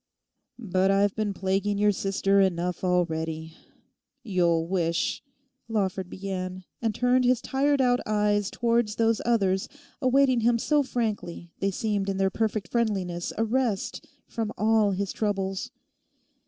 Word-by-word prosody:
'But 190 -5 +1
I've 200 0 +2
been 215 -2 -1
plaguing 195 +1 -1
your 210 0 +4
sister 195 0 +1
enough 180 -1 0
already. 160 -3 -1 0.7
You'll 175 -6 +1
wish...' 170 -2 -1 0.5
Lawford 190 -4 -1
began, 185 -1 -5 0.2
and 225 -2 -1
turned 250 +1 +3
his 250 -1 +3
tired 280 +2 +1
out 245 -1 +3
eyes 210 -1 +1
towards 235 -2 0
those 225 -1 +2
others 195 -5 +1 0.3
awaiting 260 -1 +3
them 235 +1 +3
so 295 +5 +2
frankly 215 -10 -3
they 195 - +1
seemed 200 -1 -1
in 195 - -2
their 195 0 +1
perfect 215 -2 -1
friendliness 190 -7 -1
a 225 - +2
rest 230 -3 -1 0.2
from 225 -2 -3
all 215 -1 +3
his 195 0 -2
troubles. 195 +1 -2
205 Hz, 135 wpm, -26 LUFS, 185-230 Hz, 0.7 s, your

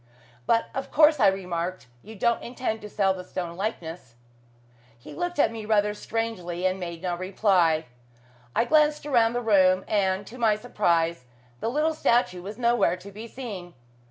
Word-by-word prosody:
"But 230 0 +2
of 270 - -4
course," 300 -1 +5
I 210 - +6
remarked, 185 -3 -2 0.2
"you 220 - -11
don't 235 +3 +1
intend 240 -2 -4
to 210 - -8
sell 195 -2 +2
the 185 -1 -7
stone 175 -2 -5
likeness?" 170 - -5 0.8
He 120 - -12
looked 350 -1 -3
at 255 - +3
me 225 -1 -6
rather 210 -1 +2
strangely, 205 -6 -3
and 185 +1 +1
made 170 -1 -6
no 180 -1 -1
reply. 180 -4 +2 0.7
I 230 - +3
glanced 300 +1 +3
around 235 -5 +3
the 245 - -1
room, 190 -4 +4
and, 195 -1 +1
to 250 +5 -11
my 220 -3 +3
surprise, 170 - 0 0.3
the 225 - -1
little 305 +5 +1
statue 185 - +1
was 205 +4 -8
nowhere 235 -6 +2
to 195 +2 -12
be 215 +4 -9
seen. 205 -9 -8
205 Hz, 170 wpm, -26 LUFS, 180-235 Hz, 0.8 s, I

